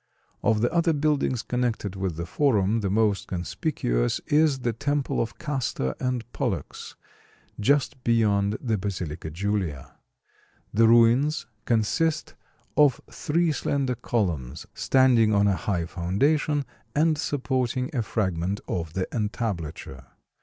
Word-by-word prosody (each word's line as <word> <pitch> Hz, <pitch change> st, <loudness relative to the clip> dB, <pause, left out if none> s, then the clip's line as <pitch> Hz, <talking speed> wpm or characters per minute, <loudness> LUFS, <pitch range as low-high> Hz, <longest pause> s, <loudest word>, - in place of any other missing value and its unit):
Of 110 Hz, -1 st, +2 dB
the 120 Hz, -, +1 dB
other 170 Hz, -1 st, +3 dB
buildings 145 Hz, -5 st, 0 dB
connected 120 Hz, -6 st, -2 dB
with 95 Hz, -3 st, -2 dB
the 85 Hz, +1 st, -4 dB
Forum 110 Hz, -, +2 dB
the 100 Hz, -3 st, -1 dB
most 105 Hz, 0 st, +1 dB
conspicuous 85 Hz, -, -1 dB
is 150 Hz, -3 st, +3 dB
the 120 Hz, -1 st, 0 dB
temple 145 Hz, +4 st, -1 dB
of 115 Hz, +1 st, -4 dB
Castor 130 Hz, -, -2 dB
and 125 Hz, -2 st, -1 dB
Pollux, -, -, -4 dB, 0.6 s
just 135 Hz, +2 st, +1 dB
beyond 105 Hz, -3 st, +2 dB
the 110 Hz, -5 st, -1 dB
Basilica 90 Hz, -5 st, -4 dB
Julia. 90 Hz, -5 st, -3 dB, 0.8 s
The 115 Hz, +2 st, +5 dB
ruins 120 Hz, +6 st, +4 dB, 0.2 s
consist 125 Hz, +8 st, 0 dB, 0.4 s
of 145 Hz, -3 st, +4 dB
three 165 Hz, +2 st, +1 dB
slender 140 Hz, -1 st, -1 dB
columns, 85 Hz, -, -2 dB
standing 120 Hz, -5 st, +4 dB
on 100 Hz, 0 st, +4 dB
a 100 Hz, -, +3 dB
high 90 Hz, -3 st, -1 dB
foundation 140 Hz, -, 0 dB, 0.3 s
and 155 Hz, +1 st, +3 dB
supporting 130 Hz, -2 st, -1 dB
a 120 Hz, -, +1 dB
fragment 95 Hz, -3 st, -1 dB
of 80 Hz, -3 st, -3 dB
the 95 Hz, +1 st, -1 dB
entablature. 90 Hz, -, -4 dB
115 Hz, 125 wpm, -26 LUFS, 95-135 Hz, 0.8 s, The